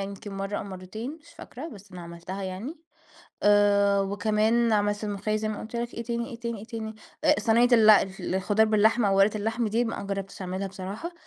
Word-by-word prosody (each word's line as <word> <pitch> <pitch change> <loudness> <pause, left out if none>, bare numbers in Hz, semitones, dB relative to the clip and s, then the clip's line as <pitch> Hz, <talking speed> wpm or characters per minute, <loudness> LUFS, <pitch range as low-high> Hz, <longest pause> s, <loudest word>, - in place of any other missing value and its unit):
يمكن 200 +1 -6
مرّة 195 +1 -3
أو - - -5
مرّتين 200 - -7
مش 335 - -20
فاكرة، 295 +1 -8
بس 200 - -13
أنا 180 - -8
عملتها 170 +3 -7
يعني. 190 - -5 0.7
آآ 200 -1 +4
وكمان 215 +3 +1
عملت 205 0 +1
الملوخية 205 +1 -1
زي 215 0 -2
ما 215 - -4
قُلت 225 +2 -7
لك 235 0 -3
إيه 235 - -4
تاني، 235 +2 -3
إيه 235 -1 -9
تاني، 235 -2 -4
إيه 200 - -9
تاني؟ 220 -1 -6 0.3
آآ - - +6
صنيّة 230 +3 +4
ال 220 -2 +7
الف 195 -2 +4
الخضار 200 +4 +1
باللحمة 215 +1 +3
أو 195 - +2
ورقة 205 +2 +4
اللحمة 225 +2 -1
دي 230 +3 +1
ما 230 - -4
جرّبتش 195 0 -5
أعملها 185 +2 -3
بصراحة، 195 - -6
210 Hz, 200 wpm, -27 LUFS, 195-225 Hz, 0.7 s, ال